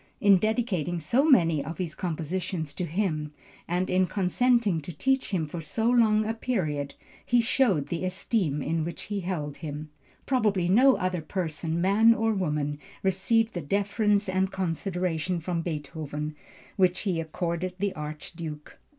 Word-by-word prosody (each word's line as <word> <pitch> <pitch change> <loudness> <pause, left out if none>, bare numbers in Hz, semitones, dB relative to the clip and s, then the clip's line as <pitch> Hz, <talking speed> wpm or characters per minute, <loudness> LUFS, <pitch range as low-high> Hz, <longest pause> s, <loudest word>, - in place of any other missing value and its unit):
In 200 -2 +6
dedicating 205 - 0
so 235 - +2
many 165 - +4
of 160 +4 -6
his 175 -4 -2
compositions 170 -1 -3
to 180 - -3
him, 155 -4 -2 0.3
and 180 +2 0
in 185 0 +2
consenting 205 -1 +2
to 155 - -7
teach 265 - 0
him 180 -6 0
for 165 +3 -6
so 225 +9 0
long 215 -3 +4
a 220 - -1
period, 155 - -2 0.3
he 245 - +3
showed 225 - +2
the 170 +1 -2
esteem 185 - -1
in 165 0 0
which 170 0 -5
he 205 0 -3
held 165 -6 -3
him. 150 -1 -6 0.3
Probably 210 -9 +1
no 255 +8 +6
other 185 -3 -1
person, 165 -1 -3
man 210 +5 +5
or 225 0 +1
woman 150 -6 -1 0.2
received 215 +4 +2
the 175 - -3
deference 205 +5 +1
and 190 +1 0
consideration 180 -1 -1
from 170 +1 -2
Beethoven, 150 -1 -4 0.4
which 185 -2 +3
he 180 -6 0
accorded 170 +2 -3
the 200 0 -1
Archduke. 150 0 -7
180 Hz, 150 wpm, -27 LUFS, 160-205 Hz, 0.4 s, In